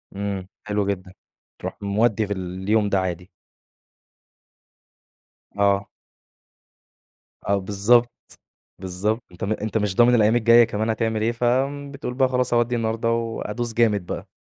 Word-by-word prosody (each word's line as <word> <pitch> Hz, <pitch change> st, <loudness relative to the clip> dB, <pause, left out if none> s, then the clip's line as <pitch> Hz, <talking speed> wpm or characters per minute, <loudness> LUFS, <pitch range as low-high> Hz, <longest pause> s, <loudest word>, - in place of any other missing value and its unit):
امم، 100 Hz, -2 st, -4 dB, 0.2 s
حلو 105 Hz, -1 st, 0 dB
جدًا 95 Hz, -2 st, -4 dB, 0.5 s
تروح -, -, -6 dB
مودّي 105 Hz, +2 st, +1 dB
في 100 Hz, -, -1 dB
اليوم 95 Hz, +3 st, -1 dB
ده 100 Hz, -1 st, +2 dB
عادي. 90 Hz, -1 st, -4 dB, 2.3 s
آه. 100 Hz, 0 st, +2 dB, 1.6 s
آه، 100 Hz, -, +3 dB
بالضبط، 105 Hz, +5 st, +3 dB, 0.7 s
بالضبط 95 Hz, +5 st, -2 dB
أنت 90 Hz, -, -6 dB
م 100 Hz, -, -1 dB
أنت 110 Hz, +1 st, -2 dB
مش 105 Hz, -3 st, -2 dB
ضامن 120 Hz, +1 st, +5 dB
الأيّام 110 Hz, 0 st, +4 dB
الجايّة 115 Hz, 0 st, +6 dB
كمان 110 Hz, 0 st, -2 dB
هتعمل 110 Hz, -1 st, -1 dB
إيه، 115 Hz, +1 st, +1 dB
ف 120 Hz, +1 st, -4 dB, 0.5 s
بتقول 135 Hz, -3 st, -5 dB
بقى 130 Hz, 0 st, +3 dB
خلاص 125 Hz, -1 st, 0 dB
أودّي 120 Hz, +1 st, +2 dB
النهارده 115 Hz, 0 st, -1 dB
وأدوس 115 Hz, 0 st, -3 dB
جامد 105 Hz, -6 st, +2 dB
بقى. -, -, -5 dB
110 Hz, 135 wpm, -23 LUFS, 100-115 Hz, 2.3 s, الجايّة